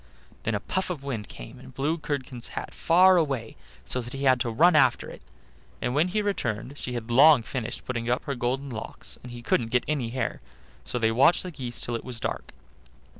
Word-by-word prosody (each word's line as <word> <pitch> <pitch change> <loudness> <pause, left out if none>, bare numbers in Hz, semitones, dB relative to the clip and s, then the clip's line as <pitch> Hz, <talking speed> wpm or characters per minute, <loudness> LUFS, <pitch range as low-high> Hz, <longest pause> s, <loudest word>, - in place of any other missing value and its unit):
Then 115 - -1
a - - 0
puff 185 - -2
of 160 -6 -4
wind 115 -7 -4
came - - -10
and 65 - -12
blew 155 +5 0
Curdken's 130 -5 -4
hat - - -4
far 185 +2 +5
away, 135 -9 -1 0.3
so 125 - -1
that 120 +1 -8
he 135 0 -4
had 130 -2 +5
to 120 - 0
run 165 +9 +5
after - - +3
it; - - -12 0.6
and 120 +2 -1
when 150 +5 +3
he 210 +3 0
returned 125 - -2
she 125 - -4
had 120 -1 -4
long 140 +1 +7
finished 120 -1 -4
putting 115 -2 -3
up 125 - +1
her 140 - -2
golden 130 +2 -2
locks, 110 -2 -6
and 125 - -10
he 120 0 -9
couldn't 115 0 +1
get 125 +1 +2
any 140 -6 -1
hair; 130 +2 -3 0.4
so - - -4
they 110 -2 +2
watched 135 +9 +4
the 180 - -6
geese 125 -5 -5
till 120 - -2
it 115 - -4
was 125 -2 -5
dark. - - -4
125 Hz, 220 wpm, -27 LUFS, 120-150 Hz, 0.6 s, long